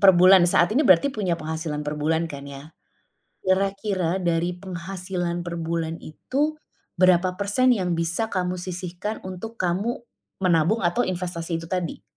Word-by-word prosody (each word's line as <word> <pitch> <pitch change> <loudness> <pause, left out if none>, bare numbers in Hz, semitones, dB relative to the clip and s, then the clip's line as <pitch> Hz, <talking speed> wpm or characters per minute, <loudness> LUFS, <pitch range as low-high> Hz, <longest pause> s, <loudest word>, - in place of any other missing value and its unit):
per 195 -1 +8
bulan 185 0 +7
saat 175 +3 +3
ini, 265 - +3
berarti 190 +8 +5
punya 185 -7 -1
penghasilan 155 -2 -4
per 150 0 -3
bulan 160 +2 +1
kan 140 -1 -8
ya? 140 +3 -10 0.7
Kira-kira, 190 -1 0
dari 175 0 0
penghasilan 180 -1 -4
per 170 0 -5
bulan 165 0 -2
itu, 285 - -2 0.4
berapa 185 0 +4
persen 245 +6 +3
yang 180 -5 -1
bisa 170 +7 -1
kamu 180 -1 -1
sisihkan 180 +3 -5
untuk 190 +5 -7
kamu, 200 +9 -1 0.4
menabung 180 +4 +3
atau 175 +8 +2
investasi 175 -4 -2
itu 165 - -7
tadi? 180 -1 -3
180 Hz, 150 wpm, -24 LUFS, 165-195 Hz, 0.7 s, per